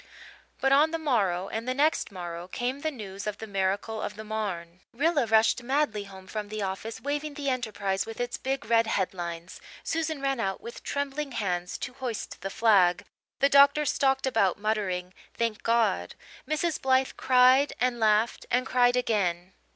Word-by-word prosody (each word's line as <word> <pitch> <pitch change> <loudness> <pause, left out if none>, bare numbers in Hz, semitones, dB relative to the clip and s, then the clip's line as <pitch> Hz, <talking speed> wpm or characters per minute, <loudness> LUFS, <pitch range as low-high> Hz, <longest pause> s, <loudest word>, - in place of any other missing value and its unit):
But 270 - +2
on 290 +3 +5
the 330 - -2
morrow 200 - 0
and 225 +4 -5
the 255 - 0
next 300 -3 +1
morrow 175 -2 -6
came 245 +7 -3
the 315 - -1
news 205 -8 -7
of 210 -1 -3
the 220 - -7
miracle 200 +2 -1
of 210 - -4
the 215 - -8
Marne. 190 -6 -4
Rilla 290 0 +1
rushed 220 +2 +4
madly 240 -5 0
home 190 -1 -12
from 210 +1 -5
the 215 -1 -3
office 195 +4 -4
waving 290 +1 -3
the 280 -2 -1
Enterprise 205 -6 -2
with 225 +1 -8
its 245 0 -2
big 270 +1 -3
red 230 -1 +3
headlines. 175 -4 -3 0.2
Susan 320 -2 -2
ran 275 -2 -1
out 195 -4 -1
with 235 - -9
trembling 285 0 -3
hands 180 -5 -2
to 250 - -6
hoist 245 -4 -5
the 195 - -3
flag. 195 -5 +3 0.4
The 275 - +5
doctor 280 +2 +6
stalked 270 -1 +1
about 220 -8 +2
muttering 195 -4 -2 0.2
"Thank 230 -2 -1
God." 225 - +1 0.3
Mrs. 310 +2 -1
Blythe 260 0 +2
cried 255 +2 +5
and 245 0 +1
laughed 215 +1 +2
and 250 +1 +1
cried 245 -1 +3
again. 185 -7 0
225 Hz, 175 wpm, -27 LUFS, 195-270 Hz, 0.4 s, doctor